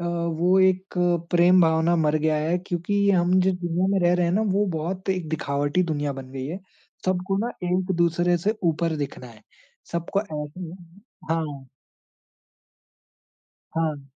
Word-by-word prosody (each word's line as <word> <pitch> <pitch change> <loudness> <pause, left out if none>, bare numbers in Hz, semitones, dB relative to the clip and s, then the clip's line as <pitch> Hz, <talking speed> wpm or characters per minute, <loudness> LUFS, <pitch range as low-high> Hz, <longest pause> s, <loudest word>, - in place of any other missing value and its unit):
अ, 175 - -4
वो 170 +1 +1
एक 190 0 +2 0.4
प्रेम-भावना 170 -1 +4
मर 155 -1 +2
गया 155 0 +1
है 160 +4 0
क्योंकि 195 +3 0
हम 180 -1 +3
जिस 185 0 +2
दुनिया 175 0 -1
में 195 - +2
रह 175 - +4
रहे 175 -1 +2
हैं 170 - 0
ना, 210 - +2
वो 205 0 +1
बहुत 175 +4 -4
एक 185 -4 -2
दिखावटी 145 +2 0
दुनिया 145 -4 -1
बन 130 -1 -9
गई 135 0 -5
है। 170 +5 -5 0.5
सबको 185 +1 0
ना - - -3
एक-दूसरे 175 -1 +1
से 210 +6 0
ऊपर 165 0 +1
दिखना 140 -3 -5
है। 110 -3 -15 0.5
सबको 170 +3 -1
ऐसे 150 -4 -6
ही 175 -3 -6
है। 180 - -10 0.5
हाँ। 150 -5 -2 2.1
हाँ। 155 -4 -1
170 Hz, 155 wpm, -24 LUFS, 155-185 Hz, 2.1 s, प्रेम-भावना